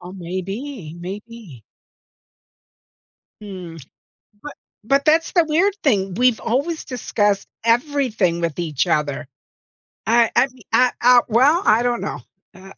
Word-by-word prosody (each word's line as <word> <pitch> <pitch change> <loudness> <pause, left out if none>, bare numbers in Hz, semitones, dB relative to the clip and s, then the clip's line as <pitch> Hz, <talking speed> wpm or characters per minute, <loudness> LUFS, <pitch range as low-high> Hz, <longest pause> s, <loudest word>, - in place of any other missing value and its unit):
Oh, 180 +1 -10
maybe, 190 - -6
maybe. 195 - -9 1.8
Mm. 180 -6 -9 0.6
But 295 - -8 0.3
but 275 +5 +1
that's 320 +2 +3
the 345 -3 +4
weird 365 +6 +2
thing, 195 -9 +1
we've 245 +3 +2
always 280 +8 -2
discussed 210 -5 -1 0.2
everything 230 - +1
with 170 -1 -3
each 155 -4 -1
other. 150 -1 -1 0.8
I 230 +1 +3
I - - +5
mea 255 -2 -19
I, 250 0 +4
uh 245 0 +7
well? 275 - +3
I 220 +2 +4
don't 245 -1 0
know. - - -4 0.3
Uh 190 +1 -13
225 Hz, 125 wpm, -20 LUFS, 180-260 Hz, 1.8 s, uh